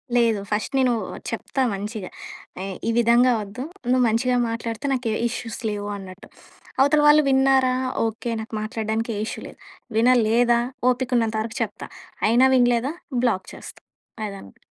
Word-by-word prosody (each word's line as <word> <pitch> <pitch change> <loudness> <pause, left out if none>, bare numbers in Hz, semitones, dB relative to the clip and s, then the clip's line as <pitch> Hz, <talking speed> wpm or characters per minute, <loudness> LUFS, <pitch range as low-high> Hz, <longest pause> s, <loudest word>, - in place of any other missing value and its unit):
లేదు 230 -3 +3
ఫస్ట్ 215 +6 -1
నేను 255 -2 +3 0.4
చెప్తా 270 - -3
మంచిగా. 205 0 -5 0.5
ఏయ్, 195 -1 -5
ఈ - - +2
విధంగా 240 +2 +5
వద్దు 210 +6 -7 0.3
నువ్వు 255 0 +4
మంచిగా 245 +3 +1
మాట్లాడితే 230 +1 -4
నాకే 240 -4 -1 0.2
ఇష్యూస్ 230 -1 -6
లేవు 205 0 -4
అన్నట్టు. 190 -1 -11 0.5
అవతల 290 +2 +4
వాళ్ళు 300 +1 +7
విన్నారా 265 -1 +4 0.3
ఓకే 225 +2 -3
నాకు 220 - -10
మాట్లాడడానికి 220 +1 -2
ఏ - - -3
ఇష్యూ - - -6
లేదు. - - -14 0.4
వినలేదా 235 0 +4 0.3
ఓపికున్నంత 240 -3 0
వరకు 230 +3 -6
చెప్తా 210 -2 -4 0.4
అయినా 240 +4 +5
వినలేదా 245 +3 +2 0.3
బ్లాక్ 190 -6 0
చేస్తా - - -11 0.4
అదనామాట. 195 - -9
230 Hz, 140 wpm, -23 LUFS, 215-255 Hz, 0.5 s, వాళ్ళు